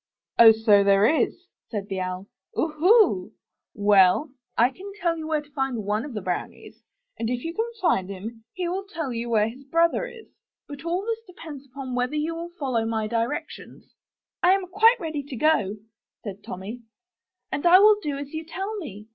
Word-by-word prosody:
'^So 220 -3 +7
there 200 +1 +4
is," 320 +6 +1 0.2
said 205 -3 -4
the 190 -1 -3
Owl. 185 +1 -4 0.3
'^Oohoo! 315 - +3 0.4
Well, 205 - +4 0.3
I 240 +3 +4
can 390 +7 -10
tell 340 -2 +1
you 315 -1 -6
where 310 -1 0
to 295 - -23
find 270 -5 -2
one 210 +4 -1
of 275 -6 -8
the 210 - -4
brownies: 180 -1 -5 0.4
and 225 - -1
if 245 0 -2
you 330 - -4
can 450 +5 -1
find 195 - +1
him, 220 +4 -8
he 360 -1 -3
will 380 +3 -3
tell 320 -10 -4
you 235 +1 -4
where 215 -2 +3
his 250 +5 -9
brother 335 - +1
is. 470 -2 -12 0.4
But 285 0 -9
all 355 +4 -1
this 455 0 -3
depends 310 -6 -10
upon 260 0 -7
whether 250 +3 -1
you 305 +2 -1
will 335 +1 -6
follow 255 -6 0
my 225 -1 -1
directions." 230 +5 -4 0.5
I 360 +1 +6
am 390 -1 0
quite 445 +6 +5
ready 315 -5 -3
to 280 -1 -8
go," 225 -8 +2 0.5
said 200 -2 -7
Tommy, 200 +7 -7 0.7
*'and 285 +5 0
I 355 +2 +9
will 420 +2 +7
do 290 -5 -3
as 285 +1 -7
you 315 0 -4
tell 385 +6 -5
me. 210 - -8
275 Hz, 190 wpm, -25 LUFS, 220-335 Hz, 0.7 s, I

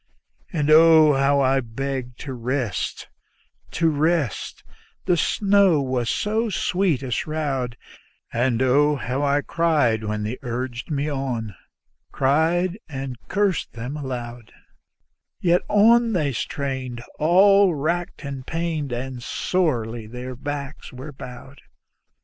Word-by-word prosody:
And 155 -3 0
oh, 160 -1 +7
how 140 +1 +3
I 135 0 +3
begged 125 +1 -5
to 135 - -5
rest, 125 -2 -3 0.6
to 165 - +1
rest 155 - 0 0.4
the 180 - +3
snow 195 -1 +3
was 130 -3 -1
so 220 +2 0
sweet 180 -6 0
a 130 - -5
shroud; 140 -5 -2 0.6
And 120 +1 +1
oh, 145 +3 +3
how 130 +1 -3
I 145 0 +2
cried 150 -10 +1
when 105 0 -2
they 110 +5 -4
urged 120 -1 -4
me 145 -1 -1
on, 130 -7 -3 0.6
cried 170 +7 +1
and 135 -3 -5
cursed 200 -4 0
them 125 +4 -6
aloud; 120 -5 -6 0.9
Yet 175 0 +3
on 230 +2 +5
they 150 -7 0
strained, 130 -1 -4 0.2
all 190 +3 +5
racked 170 +3 -2
and 135 -2 -5
pained, 160 -2 -3
and 125 +1 -4
sorely 120 -9 -1
their 125 +2 -7
backs 140 +2 -6
were 130 +4 -8
bowed. 130 +2 -11
140 Hz, 120 wpm, -23 LUFS, 125-165 Hz, 0.9 s, oh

